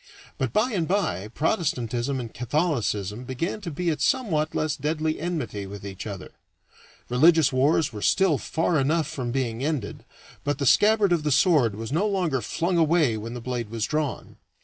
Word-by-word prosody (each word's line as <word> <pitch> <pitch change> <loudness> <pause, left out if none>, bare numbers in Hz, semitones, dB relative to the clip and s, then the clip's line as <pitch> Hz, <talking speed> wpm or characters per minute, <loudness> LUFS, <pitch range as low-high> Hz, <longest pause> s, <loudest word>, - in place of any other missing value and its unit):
But - - -1
by 225 +4 +1
and 170 -5 0
by 175 - 0
Protestantism 130 - -1
and 115 -3 -6
Catholicism 120 - -1
began 150 - -3
to 185 - -5
be 170 +2 -1
at 155 - -4
somewhat 180 - +1
less 155 -2 0
deadly 155 +2 -1
enmity 145 - -3
with 100 +1 -9
each 100 +1 -7
other; 100 -3 -7 0.8
religious 155 +4 +4
wars 140 +1 +2
were 105 - -6
still 185 - +3
far 160 +3 0
enough 155 +4 +1
from 125 -4 -4
being 125 -2 -2
ended, 140 -8 -3 0.4
but 145 -1 -1
the 140 - -2
scabbard 210 - +4
of 170 -2 +3
the 150 0 -1
sword 140 - +4
was 115 +3 -6
no 175 +8 +1
longer 180 -10 0
flung 170 +6 -1
away 160 -7 +3
when 115 +3 -6
the 120 - -6
blade 120 -2 -4
was 115 0 -2
drawn. 150 -3 -3
145 Hz, 175 wpm, -25 LUFS, 120-165 Hz, 0.8 s, religious